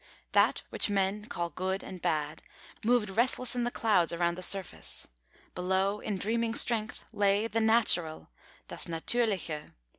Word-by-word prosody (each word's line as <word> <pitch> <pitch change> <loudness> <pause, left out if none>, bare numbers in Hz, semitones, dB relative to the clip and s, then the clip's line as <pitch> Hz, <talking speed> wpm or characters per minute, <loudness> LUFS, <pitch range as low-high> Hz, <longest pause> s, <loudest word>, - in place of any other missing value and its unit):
That - - +3
which - - +2
men 200 +1 0
call 170 -5 -4
Good 190 +1 -3
and 185 -2 -9
Bad, 155 -3 -2 0.4
moved 225 -3 +2
restless 250 +3 +2
in 245 -1 0
the - - 0
clouds 210 -8 +1
around 170 0 0
the 185 - -8
surface; 190 0 -1 0.5
below, 190 +3 0
in 210 -2 -3
dreaming 230 +3 -1
strength, 225 -3 +3
lay 200 +1 +2
the 225 0 -1
Natural 220 -8 +3 0.4
(das - - -4
Natürliche). 170 -3 -2
200 Hz, 145 wpm, -29 LUFS, 180-225 Hz, 0.5 s, That